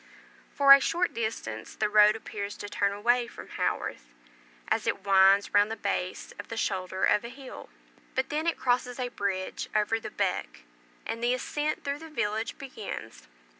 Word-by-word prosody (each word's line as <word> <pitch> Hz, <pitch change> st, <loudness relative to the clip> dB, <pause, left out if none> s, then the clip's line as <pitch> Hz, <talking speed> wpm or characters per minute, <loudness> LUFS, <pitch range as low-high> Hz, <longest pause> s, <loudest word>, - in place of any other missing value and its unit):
For 275 Hz, -1 st, +8 dB
a 275 Hz, -, +8 dB
short 345 Hz, +5 st, 0 dB
distance 220 Hz, -, -4 dB
the 215 Hz, -, +1 dB
road 210 Hz, 0 st, +6 dB
appears 205 Hz, -2 st, -6 dB
to 205 Hz, -, -6 dB
turn 200 Hz, 0 st, 0 dB
away 240 Hz, +4 st, +1 dB
from -, -, -11 dB
Haworth, -, -, -3 dB, 0.5 s
as -, -, 0 dB
it -, -, 0 dB
winds 195 Hz, 0 st, +5 dB
round 205 Hz, +1 st, +5 dB
the 225 Hz, -, -3 dB
base 185 Hz, -4 st, -3 dB
of -, -, -7 dB
the 225 Hz, -, -6 dB
shoulder 190 Hz, -3 st, -2 dB
of 210 Hz, -, +4 dB
a 235 Hz, -, -6 dB
hill; 265 Hz, +1 st, -10 dB, 0.5 s
but 260 Hz, 0 st, 0 dB
then 310 Hz, +2 st, -1 dB
it 335 Hz, -, +1 dB
crosses 250 Hz, 0 st, 0 dB
a 250 Hz, -1 st, -1 dB
bridge 195 Hz, -4 st, -3 dB
over 215 Hz, +1 st, +2 dB
the 220 Hz, -, -6 dB
"beck," 190 Hz, -, -2 dB, 0.4 s
and 230 Hz, +1 st, -4 dB
the 245 Hz, +1 st, +3 dB
ascent 295 Hz, +4 st, -2 dB
through 280 Hz, 0 st, -2 dB
the 320 Hz, 0 st, -10 dB
village 220 Hz, -6 st, -2 dB
begins. 220 Hz, -, -8 dB
220 Hz, 175 wpm, -28 LUFS, 200-250 Hz, 0.5 s, For